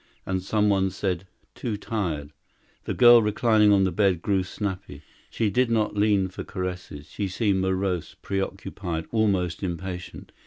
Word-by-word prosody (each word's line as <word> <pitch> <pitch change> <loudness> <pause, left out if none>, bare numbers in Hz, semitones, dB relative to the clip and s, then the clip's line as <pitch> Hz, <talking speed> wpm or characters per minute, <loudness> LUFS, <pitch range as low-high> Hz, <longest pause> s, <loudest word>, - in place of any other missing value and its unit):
And 95 0 -1
some 105 +2 +1
one 95 -2 +2
said: 95 0 -3 0.3
"Too 110 -4 -4
tired!" 85 -10 -3 0.5
The - - -2
girl 120 -1 +8
reclining 105 0 +3
on 100 -1 +5
the 95 - +1
bed 95 -2 +1
grew 100 -2 +2
snappy. 95 -6 -5 0.3
She 110 -3 0
did 125 +1 +2
not 110 -2 +1
lean 100 -2 +3
for 95 - -7
caresses. 90 -5 -6
She 100 +6 -3
seemed 95 0 0
morose, 95 -3 -1
preoccupied, 95 -3 -4
almost 100 -6 +1
impatient. 90 -1 -6
95 Hz, 150 wpm, -25 LUFS, 90-105 Hz, 0.5 s, girl